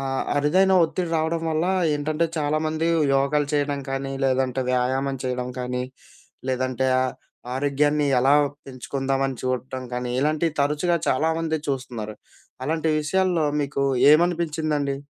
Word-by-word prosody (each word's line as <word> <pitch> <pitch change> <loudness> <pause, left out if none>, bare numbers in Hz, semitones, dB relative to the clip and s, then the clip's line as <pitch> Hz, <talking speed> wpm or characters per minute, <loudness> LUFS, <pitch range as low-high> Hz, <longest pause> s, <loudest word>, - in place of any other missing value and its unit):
ఆహ్, 135 -1 -2
అరుదైన 185 +7 +3
ఒత్తిడి 165 +2 -1
రావడం 160 +1 0
వల్ల 160 +1 0 0.3
ఏంటంటే 155 +3 0
చాలామంది 155 +1 0 0.3
యోగాలు 140 +2 +2
చేయడం 145 -1 0
కానీ 135 0 -3
లేదంటే 130 -1 +1
వ్యాయామం 130 +2 0
చేయడం 125 -1 -2
కానీ 125 0 -2 0.7
లేదంటే 130 0 0
ఆ! - - +3 0.5
ఆరోగ్యాన్ని 145 +2 +1
ఎలా 135 +3 +4 0.3
పెంచుకుందాం 135 +1 -3
అని 135 -1 -4
చూడడం 130 0 -3
గానీ 125 0 -3
ఇలాంటివి 155 +3 +1
తరచుగా 150 +5 +1
చాలామంది 160 +3 +1
చూస్తున్నారు. 125 -6 -4 0.5
అలాంటి 160 +3 0
విషయాల్లో 175 +1 +1 0.2
మీకు 140 -1 -2 0.3
ఏమనిపించిందండి? 155 -4 +1
145 Hz, 120 wpm, -24 LUFS, 130-155 Hz, 0.7 s, ఎలా